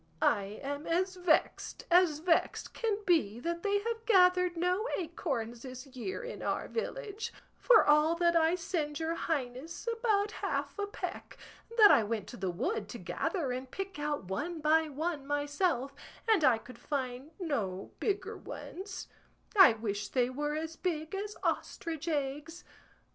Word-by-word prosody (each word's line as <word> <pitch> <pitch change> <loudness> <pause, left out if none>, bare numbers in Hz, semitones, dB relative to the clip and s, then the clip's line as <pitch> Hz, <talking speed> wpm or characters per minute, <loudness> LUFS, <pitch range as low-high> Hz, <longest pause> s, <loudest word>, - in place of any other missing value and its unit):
I 205 -1 +1
am 285 +2 -4
as 370 +3 +1
vexed 355 -3 +1
as 345 -4 +5
vexed 330 +1 +1
can 440 -3 0
be 270 - +2
that 340 +2 -2
they 405 +1 +2
have 455 +1 -3
gathered 360 -4 +5
no 360 +6 +1
acorns 270 - -3
this 255 0 -8
year 275 - -5
in - - -6
our - - -1
village; 455 -2 -4 0.3
for 480 -3 +6
all 300 +2 +5
that 340 0 +3
I 325 +1 +4
send 320 -4 -2
your 325 0 -1
highness 290 - -3
about 420 -3 +2
half 430 - -3
a 405 - -1
peck 410 - -6 0.4
that 420 -2 +9
I 230 - +6
went 215 -1 -2
to 240 - -8
the 190 -1 -2
wood 360 - -2
to - - -6
gather 330 - -2
and 255 +1 -4
pick 390 +1 -5
out 295 -3 -1
one 310 - -3
by 310 +1 +3
one 295 -1 -3
myself, 290 -1 0 0.3
and 430 -7 +4
I 255 -5 +6
could 235 +1 -13
find 260 -1 -3
no 210 - -2
bigger 405 +1 -1
ones; 380 +1 -7 0.5
I 380 - +9
wish 210 -2 -3
they 250 +1 +1
were 295 +3 -2
as 320 +1 -4
big 315 -3 -2
as 410 +2 -4
ostrich 325 -1 -2
eggs. 295 +2 -2
320 Hz, 160 wpm, -32 LUFS, 270-370 Hz, 0.5 s, that